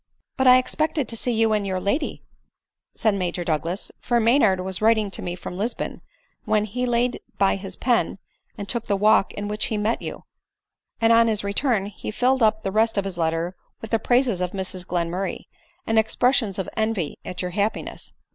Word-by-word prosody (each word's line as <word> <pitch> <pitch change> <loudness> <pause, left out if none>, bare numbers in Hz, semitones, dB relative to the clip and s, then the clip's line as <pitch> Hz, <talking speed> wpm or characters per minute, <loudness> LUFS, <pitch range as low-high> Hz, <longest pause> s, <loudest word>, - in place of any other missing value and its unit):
" - - -62
But 265 - +2
I 250 0 +9
expected 295 +1 0
to 230 - -3
see 245 +2 -1
you 225 -1 +2
and 210 -1 +1
your 185 -1 -1
lady," 205 - -2 0.7
said 220 -2 +2
Major 180 -2 -2
Douglas; 165 +3 -2
" - - -46
for 240 -1 +1
Maynard 225 -5 +4
was 185 +1 -3
writing 220 -2 +3
to - - -4
me 175 - -4
from 180 0 -7
Lisbon 230 +4 -3 0.4
when 215 -1 +1
he 250 +4 -2
laid 240 +1 +1 0.2
by 195 - +3
his 195 -1 -6
pen 240 -2 +1 0.4
and 200 -1 -6
took 235 +2 -2
the 200 - +2
walk 210 0 +4
in 205 0 -4
which 210 +1 -1
he 220 - -2
met 215 +3 0
you; - - -6 0.8
and 230 0 +4
on 230 0 +6
his 215 -2 0
return 200 +1 +1
he 205 0 -7
filled 255 +4 +1
up 220 -1 +3
the 195 - -2
rest 220 +1 +2
of 200 - +1
his 185 -3 -5
letter 165 +2 -1 0.2
with 225 - -9
the 225 - +3
praises 245 -6 +2
of 180 -1 -2
Mrs 185 -2 -4
Glenmurray, 175 +2 -2 0.4
and 225 0 +3
ex 220 0 -1
pressions 245 -6 +2
of 190 - -3
envy 220 -8 -1
at 180 0 -5
your 180 - -3
happiness." 205 +4 -3
210 Hz, 205 wpm, -24 LUFS, 190-230 Hz, 0.8 s, I